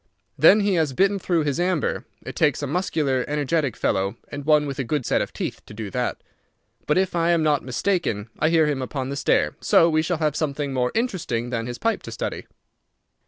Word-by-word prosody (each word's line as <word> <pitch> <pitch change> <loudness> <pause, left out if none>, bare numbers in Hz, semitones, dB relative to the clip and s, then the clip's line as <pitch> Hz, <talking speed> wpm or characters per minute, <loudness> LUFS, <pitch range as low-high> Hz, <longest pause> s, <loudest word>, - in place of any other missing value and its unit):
Then 210 - +6
he 200 -1 +1
has 150 -4 -1
bitten 195 +7 +2
through 170 -3 +1
his 145 +1 -1
amber. 180 -3 0 0.2
It - - -7
takes 150 -2 +1
a - - +1
muscular, 145 -4 0
energetic 145 -1 0
fellow, 95 +1 0
and 145 -1 -7
one 150 -1 +4
with 140 -1 -5
a - - +1
good 130 +1 -2
set - - +1
of - - -3
teeth, - - -5
to 105 - -11
do 105 -2 -6
that. 125 +4 -2 0.6
But 150 - +2
if 190 -1 +1
I 170 0 +2
am 170 -2 +3
not 150 -2 +2
mistaken 130 - -1
I 155 - +3
hear 165 -1 +4
him 145 -3 -1
upon 130 0 -4
the 140 - -3
stair, 140 - +1
so 165 0 +4
we 155 0 +3
shall 165 +2 -1
have 155 -2 0
something 145 -2 -2
more 125 -1 0
interesting 165 - -2
than 115 -1 -2
his 120 0 -5
pipe 230 0 0
to - - -9
study." - - -5
150 Hz, 215 wpm, -23 LUFS, 130-170 Hz, 0.6 s, Then